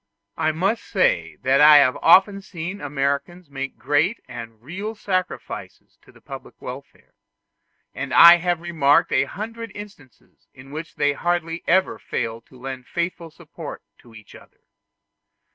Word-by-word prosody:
I 155 - 0
must 195 +8 -1
say - - 0
that 135 +2 +3
I 150 0 +9
have 140 -2 +4
often 195 +4 +5
seen 180 +1 -7
Americans 140 +4 -3
make 135 0 -6
great 150 - +1
and 115 -2 -9
real 190 - -6
sacrifices 185 -3 -5
to - - -20
the - - -20
public - - -11
welfare; - - -11 0.8
and - - -5
I 170 +1 +9
have 175 -1 -1
remarked 155 -5 +2
a - - +2
hundred 230 +2 -7
instances 195 - -14
in 130 +2 -14
which 160 +3 -7
they 145 0 +1
hardly 170 +1 -2
ever 190 +2 +2
failed 115 0 -4
to 130 - -18
lend 130 -1 -7
faithful 170 -1 -4
support - - -10 0.2
to 115 -2 -18
each 110 -2 -15
other. - - -18
165 Hz, 145 wpm, -22 LUFS, 140-185 Hz, 0.8 s, I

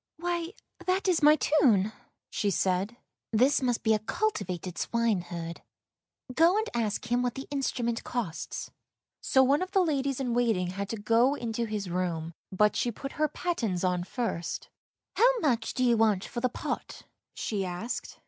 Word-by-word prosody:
" - - -64
Why, 345 +1 -2 0.3
that 375 +2 +1
is 355 -3 +3
my 300 +1 +7
tune," 235 -10 +3 0.4
she 205 - 0
said; 195 +4 0 0.2
" - - -63
this 275 +3 +4
must 245 -3 0
be 220 - +4
a 215 - +2
cultivated 195 - -2
swineherd. 175 -8 -1 0.7
Go 335 +8 +5
and 440 +1 0
ask 230 0 -2
him 245 0 +3
what 245 -1 -1
the 270 - -6
instrument 245 -4 -1
costs." 210 -9 -4 0.5
So 265 - +4
one 280 +4 +3
of 370 +1 -4
the 385 -2 +5
ladies 275 -5 0
in 250 -3 -1
waiting 225 -7 +1
had 200 +1 -4
to 225 - -3
go 230 +6 +3
into 235 -3 -2
his 210 -3 -3
room, 170 -2 -2 0.2
but 210 +2 +3
she 240 - 0
put 275 +5 -7 0.2
pattens 225 - -1
on 180 -1 +1
first. 195 -5 -3 0.2
" - - -62
How - - +5
much 245 - 0
do 255 - +1
you 240 -2 +4
want 215 -4 +3
for 240 - -5
the 255 - +2
pot," - - -5 0.3
she 205 -3 -2
asked. 185 +6 -4
235 Hz, 175 wpm, -29 LUFS, 195-275 Hz, 0.7 s, my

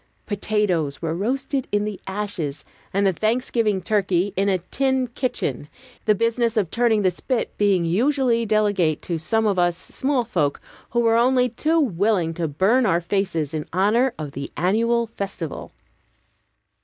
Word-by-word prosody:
Potatoes 200 -8 -1
were 160 -1 -2
roasted 265 - -2
in 205 0 +1
the 210 -3 -5
ashes, 190 -8 -4 0.3
and 200 +1 +1
the 190 - +3
Thanksgiving 220 -1 0
turkey 195 -1 +1
in 195 +1 +1
a 190 - +2
"tin 265 +8 0
kitchen," 150 - -2 0.4
the 215 - +4
business 230 +1 0
of 195 -6 +1
turning 230 -3 +2
the 185 - +3
spit 240 +7 -2
being 195 -4 +3
usually 240 - +2
delegate 205 -7 +1
to 170 -2 -2
some 220 +7 +1
of 200 -3 +1
us, 175 -1 +2
small 260 +7 -1
folk, 155 -11 0 0.3
who 235 - +1
were 230 -1 +3
only 250 +1 +3
too 315 +8 +1
willing 200 - +1
to 165 0 -2
burn 205 - +2
our 170 -3 +3
faces 170 -4 -1
in 155 -1 -3
honor 215 +8 +3
of 150 -3 -5
the 140 +1 -6
annual 230 +7 +2
festival. 195 -7 -6
205 Hz, 155 wpm, -23 LUFS, 175-235 Hz, 0.4 s, the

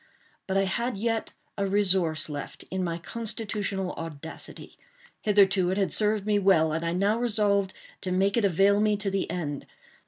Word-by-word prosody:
But 190 0 0
I 195 - +3
had 235 +4 -1
yet 225 +1 -1 0.3
a 200 - +1
resource 185 -6 +2
left, 145 -2 -7
in 190 0 -1
my 170 -1 -2
constitutional 205 -1 -3
audacity. 160 -1 -9 0.4
Hitherto 195 -3 +4
it 190 - 0
had 195 -2 +1
served 210 -1 +1
me 210 -1 +2
well, 175 -5 +4
and 165 +1 -2
I 170 0 -1
now 200 +5 +1
resolved 205 -4 +1 0.3
to 185 - -3
make 195 +2 +2
it 235 - +2
avail 200 +2 +4
me 210 -1 +2
to 200 -1 -2
the 195 -1 -1
end. 145 -6 -4
195 Hz, 175 wpm, -27 LUFS, 180-210 Hz, 0.4 s, Hitherto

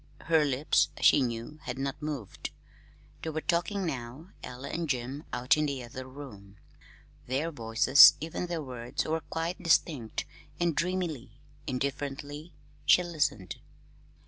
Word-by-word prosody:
Her 160 -2 +3
lips, 140 +1 +2
she 145 - +6
knew, 120 +4 -3
had 125 0 -4
not 135 +2 -3
moved. 145 -9 -5 0.7
They 160 - -3
were 155 0 -2
talking 180 +5 0
now 135 +3 -5
Ella 125 +3 -7
and 165 -2 -3
Jim 130 +3 -3
out 125 +4 +2
in 150 0 +1
the 135 -3 -3
other 130 +2 -8
room. 105 -8 -11 0.7
Their 140 +6 -1
voices, 130 +3 +7
even 160 +3 -4
their 170 -3 -3
words, 125 -3 -4
were 160 +1 0
quite 165 +3 -4
distinct, 150 -8 +1 0.3
and 170 -3 +1
dreamily, 165 - -2 0.3
indifferently, 145 +4 -4 0.3
she 180 - +6
listened. 145 - -1
140 Hz, 135 wpm, -29 LUFS, 125-160 Hz, 0.7 s, voices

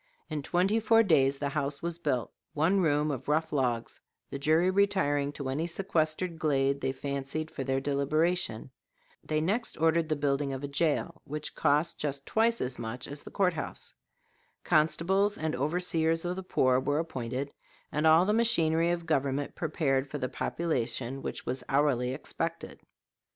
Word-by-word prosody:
In 150 -1 -2
twenty 185 +8 +1
four 225 +1 +5
days 140 -8 +3
the 140 0 -2
house 140 0 -3
was 170 0 -3
built 130 -7 -1 0.2
one 165 +6 +3
room 150 -2 +2
of 130 -2 -5
rough 155 +2 0
logs, 125 -5 -1 0.3
the 140 - -4
jury 160 +5 +3
retiring 185 -8 +2
to 140 -2 -5
any 145 +6 -1
sequestered 170 -1 -1
glade 140 -2 +1
they 130 - 0
fancied 140 +3 -4
for 135 - -4
their 135 +1 0
deliberation. 140 -2 0 0.5
They 155 0 -1
next 215 +8 -1
ordered 165 0 +2
the 155 - +2
building 140 -1 0
of 135 +1 -5
a - - -2
jail, 160 +3 -1
which 150 +1 -5
cost 150 +4 +1
just 140 -2 -3
twice 230 +1 +2
as 125 0 -2
much 120 +2 -5
money - - -9
as 145 - -7
the - - -10
court 185 -3 +1
house. 155 - -5 0.7
Constables 190 +6 +2
and 155 -3 -2
overseers 165 +3 +1
of 175 +1 -1
the 190 - -4
poor 130 -8 +2
were 145 +2 0
appointed, 135 -3 -3 0.4
and 150 +2 +1
all 160 +3 +6
the 210 - +2
machinery 170 -8 +2
of 175 -1 -1
government 140 -2 0
prepared 140 -4 0
for - - -4
the 130 - -2
population 130 -5 -2
which - - -5
was 130 +2 -2
hourly 135 -3 +2
expected. 135 - -4
150 Hz, 170 wpm, -29 LUFS, 140-170 Hz, 0.7 s, all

